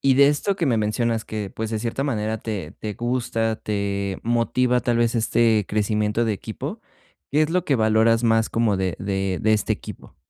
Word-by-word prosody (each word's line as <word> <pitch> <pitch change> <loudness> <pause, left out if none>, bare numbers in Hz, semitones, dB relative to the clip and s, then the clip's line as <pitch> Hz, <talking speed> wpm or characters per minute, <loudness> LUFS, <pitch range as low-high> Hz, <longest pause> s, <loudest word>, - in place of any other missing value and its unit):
Y 135 -1 +4
de 140 +1 +6
esto 150 +7 0
que 180 -4 -1
me 120 -4 +2
mencionas 110 +1 0
que, 105 -3 -5
pues, 110 +2 -4
de 110 - -1
cierta 120 +4 -2
manera, 110 -5 -1
te 100 -8 -5
te 105 - -4
gusta, 115 -2 -1
te 100 -2 -2
motiva, 120 +2 +1
tal 120 -1 0
vez, 120 0 +2
este 115 -1 +2
crecimiento 105 +1 0
de 110 - +1
equipo, 100 - -6 0.5
¿qué 150 +2 +4
es 155 - 0
lo 180 0 +1
que 145 - +1
valoras 110 +1 +3
más 115 -1 +3
como 115 -3 +1
de 95 -2 -1
de 95 -1 -1
de 110 -1 +3
este 105 -2 +1
equipo? - - -9
110 Hz, 200 wpm, -23 LUFS, 105-120 Hz, 0.5 s, de